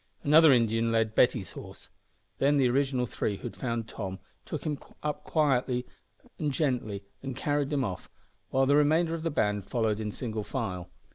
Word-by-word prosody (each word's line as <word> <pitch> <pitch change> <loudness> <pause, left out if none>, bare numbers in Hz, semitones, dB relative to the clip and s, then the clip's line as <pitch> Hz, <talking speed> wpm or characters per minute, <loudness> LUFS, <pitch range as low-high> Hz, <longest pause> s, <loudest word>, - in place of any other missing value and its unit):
Another 155 +1 +7
Indian 115 -2 +3
led 110 -1 +1
Betty's 115 -5 +2
horse. - - -11 0.5
Then 145 +2 +3
the 135 -2 +4
original 130 -1 +1
three 105 -3 -2
who - - -17
had - - -5
found 115 -3 -3
Tom 95 -4 -5 0.3
took - - -4
him 150 -3 -2 0.2
up 150 -1 -2
quite 130 -5 +1 0.6
gently 130 - -1 0.2
and 135 -2 -5
carried 145 +1 0
him 140 -2 +1
off, 95 -6 -5 0.4
while 135 0 +3
the 140 +2 +4
remainder 160 +3 +3
of 165 - -3
the 165 - -1
band 105 -8 0
followed 110 -2 0
in 110 -1 -2
single 110 -2 -4
file. 95 -8 -4
125 Hz, 170 wpm, -29 LUFS, 110-145 Hz, 0.6 s, Another